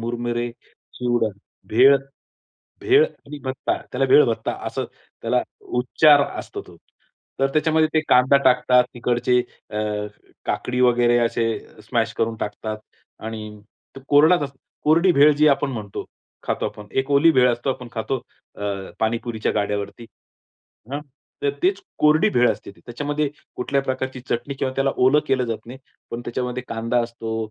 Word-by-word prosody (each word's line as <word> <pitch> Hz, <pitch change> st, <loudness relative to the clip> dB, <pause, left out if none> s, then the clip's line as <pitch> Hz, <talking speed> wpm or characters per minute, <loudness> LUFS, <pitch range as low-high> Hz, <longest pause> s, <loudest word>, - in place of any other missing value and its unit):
मुरमुरे, 120 Hz, +1 st, -2 dB, 0.5 s
चिवडा, 120 Hz, -2 st, +1 dB, 0.4 s
भेळ 130 Hz, +5 st, +7 dB, 0.8 s
भेळ 405 Hz, +4 st, +5 dB
आणि 150 Hz, -, -9 dB
भत्ता 130 Hz, 0 st, -2 dB, 0.2 s
त्याला 130 Hz, +1 st, +1 dB
भेळभत्ता 115 Hz, -6 st, +4 dB
असं -, -, -3 dB, 0.4 s
त्याला 125 Hz, +2 st, +1 dB, 0.4 s
उच्चार 145 Hz, +3 st, +5 dB, 0.2 s
असतो -, -, -6 dB
तो. -, -, -15 dB, 0.6 s
तर 135 Hz, -, +3 dB
त्याच्यामध्ये 155 Hz, +1 st, +2 dB
ते 155 Hz, -, +4 dB
कांदा 130 Hz, +2 st, +5 dB
टाकतात, 125 Hz, 0 st, +4 dB
तिकडचे 120 Hz, +1 st, +1 dB, 0.3 s
अ, 105 Hz, -, -3 dB, 0.7 s
काकडी 125 Hz, 0 st, -1 dB
वगैरे 120 Hz, -1 st, +4 dB
असे 115 Hz, 0 st, 0 dB, 0.4 s
स्मॅश -, -, 0 dB
करून 115 Hz, 0 st, 0 dB
टाकतात 110 Hz, +1 st, -4 dB, 0.5 s
आणि 110 Hz, -1 st, -7 dB, 0.4 s
ते -, -, -8 dB
कोरडाच 155 Hz, +4 st, +5 dB
असतं 140 Hz, -1 st, -6 dB, 0.3 s
कोरडी 170 Hz, +4 st, +4 dB
भेळ 145 Hz, +1 st, +6 dB
जी 150 Hz, +1 st, +5 dB
आपण 140 Hz, 0 st, +2 dB
म्हणतो, 105 Hz, -5 st, -6 dB, 0.4 s
खातो -, -, -1 dB
आपण. 105 Hz, -1 st, -8 dB
एक 135 Hz, +1 st, -1 dB
ओली 155 Hz, +4 st, +6 dB
भेळ 125 Hz, -3 st, +5 dB
असतो 120 Hz, +3 st, -2 dB
आपण 125 Hz, -2 st, -6 dB
खातो 125 Hz, +3 st, -2 dB, 0.4 s
अ, -, -, -8 dB, 0.4 s
पाणीपुरीच्या 115 Hz, 0 st, -1 dB
गाड्यावरती. 105 Hz, +3 st, -3 dB, 0.9 s
हां, 145 Hz, -, -2 dB, 0.4 s
तर 140 Hz, -, +2 dB
तेच 195 Hz, +2 st, +2 dB, 0.2 s
कोरडी 155 Hz, +7 st, +4 dB
भेळ 120 Hz, -1 st, +4 dB
असते 105 Hz, -, -6 dB
त्याच्यामध्ये 145 Hz, +7 st, -3 dB, 0.3 s
कुठल्याही 140 Hz, +2 st, -1 dB
प्रकारची 130 Hz, 0 st, -3 dB
चटणी 125 Hz, +3 st, -3 dB
किंवा 135 Hz, -1 st, -2 dB
त्याला 135 Hz, 0 st, +2 dB
ओलं 130 Hz, +4 st, +4 dB
केलं 130 Hz, -1 st, +2 dB
जात 115 Hz, -2 st, -5 dB
नाही. 125 Hz, +3 st, -9 dB, 0.3 s
पण 115 Hz, -, -4 dB
त्याच्यामध्ये 125 Hz, +1 st, -3 dB
कांदा 115 Hz, +2 st, 0 dB
असतो, 115 Hz, -1 st, -5 dB
125 Hz, 145 wpm, -22 LUFS, 115-140 Hz, 0.9 s, भेळ